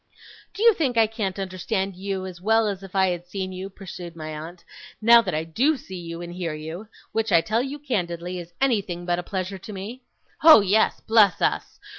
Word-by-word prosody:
'Do 420 Hz, -, -2 dB
you 465 Hz, -1 st, +8 dB
think 275 Hz, -, -1 dB
I 225 Hz, -, +6 dB
can't 215 Hz, -4 st, -3 dB
understand 190 Hz, +1 st, -2 dB
you 190 Hz, 0 st, -4 dB
as 180 Hz, -2 st, -9 dB
well 220 Hz, +2 st, +3 dB
as 200 Hz, -2 st, -3 dB
if 195 Hz, 0 st, -11 dB
I 190 Hz, -1 st, +4 dB
had 175 Hz, 0 st, -4 dB
seen 190 Hz, 0 st, -4 dB
you,' 185 Hz, +1 st, -6 dB
pursued 180 Hz, -3 st, -9 dB
my 155 Hz, -1 st, -7 dB
aunt, 165 Hz, +3 st, -9 dB, 0.3 s
'now 235 Hz, +1 st, +7 dB
that 185 Hz, -8 st, -3 dB
I 155 Hz, -, -1 dB
DO 255 Hz, -, +1 dB
see 180 Hz, -7 st, -8 dB
and 170 Hz, +1 st, -7 dB
hear 175 Hz, -3 st, -3 dB
you 160 Hz, +7 st, -7 dB, 0.2 s
which, 225 Hz, -1 st, -1 dB
I 170 Hz, -, +7 dB
tell 215 Hz, +8 st, 0 dB
you 275 Hz, +3 st, -4 dB
candidly, 180 Hz, -, -3 dB
is 170 Hz, 0 st, -9 dB
anything 200 Hz, -10 st, 0 dB
but 175 Hz, 0 st, 0 dB
a -, -, -4 dB
pleasure 190 Hz, +1 st, -4 dB
to 210 Hz, -, -9 dB
me? 210 Hz, +6 st, -7 dB, 0.4 s
Oh 315 Hz, -8 st, +10 dB
yes, 205 Hz, +3 st, +2 dB
bless 215 Hz, -4 st, +4 dB
us! -, -, -1 dB
190 Hz, 210 wpm, -24 LUFS, 175-220 Hz, 0.4 s, Oh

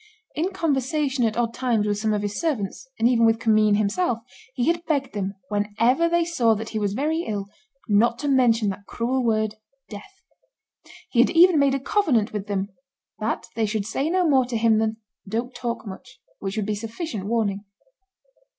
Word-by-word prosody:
In 330 Hz, +5 st, -1 dB
conversation 285 Hz, -5 st, 0 dB
at 220 Hz, 0 st, -1 dB
odd 235 Hz, -1 st, 0 dB
times 235 Hz, -4 st, 0 dB
with 205 Hz, -1 st, -1 dB
some 215 Hz, 0 st, 0 dB
of 210 Hz, -1 st, -1 dB
his 205 Hz, 0 st, -3 dB
servants, 265 Hz, -, -2 dB
and 225 Hz, -, +3 dB
even 240 Hz, -2 st, +3 dB
with 225 Hz, 0 st, +4 dB
Commynes 215 Hz, -2 st, +3 dB
himself, 220 Hz, -, 0 dB, 0.4 s
he 245 Hz, -, 0 dB
had 340 Hz, +2 st, +1 dB
begged 280 Hz, -5 st, -1 dB
them, 200 Hz, -1 st, -3 dB
whenever 225 Hz, +10 st, +1 dB
they 340 Hz, 0 st, +2 dB
saw 240 Hz, -10 st, +2 dB
that 220 Hz, +1 st, -5 dB
he 220 Hz, -, -3 dB
was 205 Hz, -1 st, -1 dB
very 310 Hz, +5 st, 0 dB
ill, 205 Hz, -2 st, -3 dB, 0.4 s
not 230 Hz, +3 st, +3 dB
to 290 Hz, -, -4 dB
mention 235 Hz, -6 st, +3 dB
that 200 Hz, +1 st, -7 dB
cruel 255 Hz, +2 st, -1 dB
word 220 Hz, -2 st, 0 dB, 0.3 s
death; 380 Hz, -, -11 dB, 0.9 s
he 240 Hz, -, +1 dB
had 245 Hz, -, +6 dB
even 345 Hz, -1 st, +6 dB
made 275 Hz, -1 st, +3 dB
a -, -, -1 dB
covenant 270 Hz, -, +1 dB
with 210 Hz, -2 st, -4 dB
them, 200 Hz, -1 st, -2 dB, 0.5 s
that 220 Hz, +1 st, -2 dB
they 225 Hz, -1 st, +1 dB
should 210 Hz, -1 st, -2 dB
say 275 Hz, +7 st, -1 dB
no 360 Hz, 0 st, +2 dB
more 265 Hz, -4 st, +4 dB
to 245 Hz, -2 st, -3 dB
him 220 Hz, -1 st, +3 dB
than, 220 Hz, 0 st, 0 dB, 0.3 s
"Don't 235 Hz, +4 st, -2 dB
talk 235 Hz, -2 st, -4 dB
much," 255 Hz, +6 st, -10 dB, 0.2 s
which 195 Hz, +2 st, -4 dB
would 215 Hz, -, 0 dB
be 210 Hz, -, -1 dB
sufficient 225 Hz, -, -5 dB
warning. 210 Hz, -3 st, -1 dB
230 Hz, 190 wpm, -24 LUFS, 210-270 Hz, 0.9 s, had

